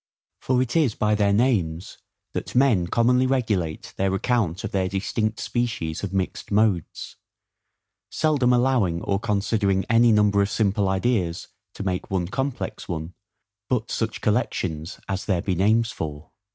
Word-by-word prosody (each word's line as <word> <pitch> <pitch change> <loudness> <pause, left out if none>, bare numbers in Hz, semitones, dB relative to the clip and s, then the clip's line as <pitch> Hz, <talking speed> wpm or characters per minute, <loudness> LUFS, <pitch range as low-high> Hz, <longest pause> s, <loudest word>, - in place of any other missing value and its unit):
For 130 -1 +1
it 120 - -6
is 150 -9 +2
by 105 0 +1
their 100 -1 +2
names 100 -7 0 0.3
that - - -5
men 120 -10 +3
commonly 125 +5 +3
regulate 105 -12 -1
their 95 0 +1
account 100 -5 0
of - - -4
their 95 -1 0
distinct 110 +3 -2
species 115 -10 -2
of 100 - -3
mixed 95 -1 -3
modes, 100 -5 0 0.9
seldom 145 -6 +2
allowing 120 -9 +2
or 100 -1 0
considering 100 -2 0
any 115 0 +5
number 105 -1 +4
of 100 - +1
simple 100 -3 +1
ideas 95 -3 -1 0.3
to - - -5
make 90 -1 -2
one 90 -3 -1
complex 135 +3 -4
one, 80 +1 -4 0.6
but 125 -3 -1
such 110 -1 -2
collections 95 -8 -1
as 95 -1 -3
there 90 -4 0
be 95 - 0
names 110 +5 +2
for. 75 0 -6
105 Hz, 150 wpm, -24 LUFS, 95-120 Hz, 0.9 s, any